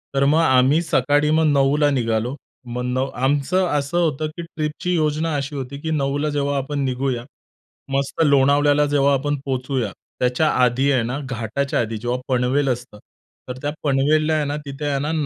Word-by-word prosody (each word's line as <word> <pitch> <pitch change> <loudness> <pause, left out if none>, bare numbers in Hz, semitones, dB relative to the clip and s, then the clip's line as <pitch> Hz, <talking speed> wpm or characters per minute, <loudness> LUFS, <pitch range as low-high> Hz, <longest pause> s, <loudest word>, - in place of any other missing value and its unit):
तर 135 - +3
मग 155 +3 +4
आम्ही 130 +2 +4
सकाळी 145 -1 +2
मग 160 0 +3
9:00 145 +1 +3
निघालो. 120 0 -1 0.3
मग 125 +1 -4
नव 130 +2 -1 0.2
आमचं 145 +7 +1
असं 145 +3 -1
होतं 155 -3 0
की - - -4
ट्रिपची 165 +2 -3
योजना 155 0 0
अशी 140 +1 -3
होती 135 +1 -5
की 160 - -3
9:00 145 0 0
जेव्हा 145 -1 -1
आपण 145 +2 -3
निघूया, 130 -1 -2 0.7
मस्त 140 +4 -1
लोणावळ्याला 145 +1 +4
जेव्हा 140 -1 +2
आपण 145 +2 0
पोहोचूया 130 -4 -2 0.3
त्याच्या 125 +5 +2 0.2
आधी 130 +3 +2
आहे 125 -4 +2
ना, 125 +4 -3
घाटाच्या 130 +1 -2
आधी, 110 -1 -3
जेव्हा 120 +3 -2
पनवेल 130 +2 +1
असतं 120 -4 -4 0.5
तर 125 - -5
त्या 145 0 -2
पनवेलला 150 +2 +2
आहे 155 -2 +1
ना, 145 - -2
तिथे 140 +2 -6
आहे 140 -1 0
ना - - -1
140 Hz, 175 wpm, -21 LUFS, 130-150 Hz, 0.7 s, मग